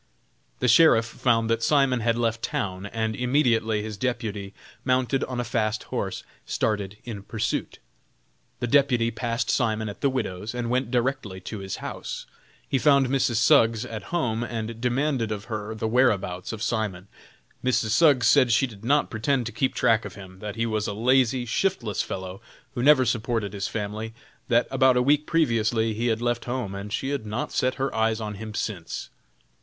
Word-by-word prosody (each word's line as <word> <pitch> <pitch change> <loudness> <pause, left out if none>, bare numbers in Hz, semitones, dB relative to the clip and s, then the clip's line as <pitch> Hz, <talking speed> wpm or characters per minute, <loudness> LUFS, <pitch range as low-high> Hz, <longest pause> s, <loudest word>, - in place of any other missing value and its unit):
The - - +2
Sheriff 120 -2 +6
found 115 -1 +1
that 115 0 +1
Simon 135 -1 +3
had 115 0 +1
left 115 -1 0
town, 95 0 -3
and 110 0 -2
immediately 120 -5 +1
his 110 -1 -6
deputy, 110 -5 -3 0.3
mounted 130 +1 +1
on 125 -1 -5
a - - 0
fast 110 -2 -1
horse, - - -4 0.2
started 105 -2 -2
in 110 -5 -6
pursuit. 110 +2 -3 0.8
The - - +1
deputy 125 -3 +3
passed 115 +1 -1
Simon 110 -3 0
at 100 - -9
the 140 - +3
widow's, 110 -4 -3
and 120 -1 -2
went 125 -1 0
directly 120 -6 -1
to 100 +3 -6
his 95 -1 -5
house. - - -6 0.4
He 135 - +1
found 140 -3 +4
Mrs. 135 -2 +1
Suggs 115 0 +4
at 110 -5 -7
home, 120 -9 0
and 115 -1 -5
demanded 125 -2 0
of 105 -2 -3
her 110 -1 -5
the 110 0 -2
whereabouts 105 -7 +1
of 110 -1 -5
Simon. 105 -5 -2 0.6
Mrs. 125 -3 +1
Suggs 130 -1 +4
said 130 -1 +5
she 115 +4 +4
did 110 -5 -11
not 145 +5 +2
pretend 120 +3 0
to 115 - -4
keep 130 +4 -1
track 115 0 +3
of - - -8
him; 95 -2 -12
that 105 +1 -6
he 115 0 0
was 110 -2 -1
a 105 - -2
lazy, 125 +2 +2
shiftless 120 - 0
fellow, 95 +1 -6 0.3
who 120 - -3
never 135 -1 +6
supported 115 -3 -1
his 100 -1 -2
family; 110 +1 -4 0.3
that - - +3
about 130 -1 +4
a - - +4
week 150 +3 +2
previously 115 -8 +1
he 115 +3 -1
had 115 0 0
left 120 -1 -1
home, 120 -5 -3
and 100 +1 -6
she 135 +3 -2
had 140 -5 -2
not 105 +3 -3
set 130 0 0
her 135 +1 -2
eyes 110 0 +1
on 105 -1 -4
him 110 +1 -7
since. 95 -8 -4
115 Hz, 180 wpm, -25 LUFS, 110-125 Hz, 0.8 s, Sheriff